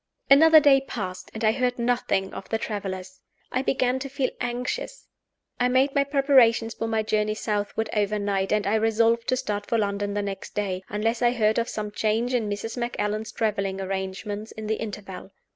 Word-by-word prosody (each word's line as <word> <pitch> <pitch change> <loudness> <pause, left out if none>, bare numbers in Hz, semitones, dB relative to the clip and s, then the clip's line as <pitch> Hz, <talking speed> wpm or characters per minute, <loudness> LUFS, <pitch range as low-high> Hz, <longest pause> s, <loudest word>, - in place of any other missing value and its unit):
Another 315 +3 +9
day 280 -2 +5
passed; 190 -8 -6
and 220 - -6
I 215 - +5
heard 250 +1 0
nothing 235 -5 0
of - - -8
the 225 - +1
travelers. 190 -4 -5 0.3
I 255 - 0
began 260 -1 +1
to 275 +1 -5
feel 270 -1 -1
anxious. 250 - -3 0.5
I 245 - +3
made 260 +2 +2
my 280 - +3
preparations 265 -5 +4
for 225 - -3
my 220 -1 0
journey 215 0 0
southward 215 +1 -2
overnight; 205 -2 0
and 210 -1 +1
I 200 - +1
resolved 225 +1 +2
to 255 - +2
start 205 -4 -3
for 230 - +1
London 205 -1 -1
the 205 - 0
next 200 -1 -6
day 190 -3 -2
unless 225 +3 -1
I 240 0 +4
heard 220 -1 +2
of 230 - -1
some 210 -1 -4
change 225 +4 0
in 225 -4 0
Mrs. 210 +4 -4
Macallan's 215 -2 -2
traveling 195 -3 -1
arrangements 195 +3 -4
in 220 - -8
the 215 0 -1
interval. 200 -3 -7
220 Hz, 185 wpm, -25 LUFS, 205-245 Hz, 0.5 s, Another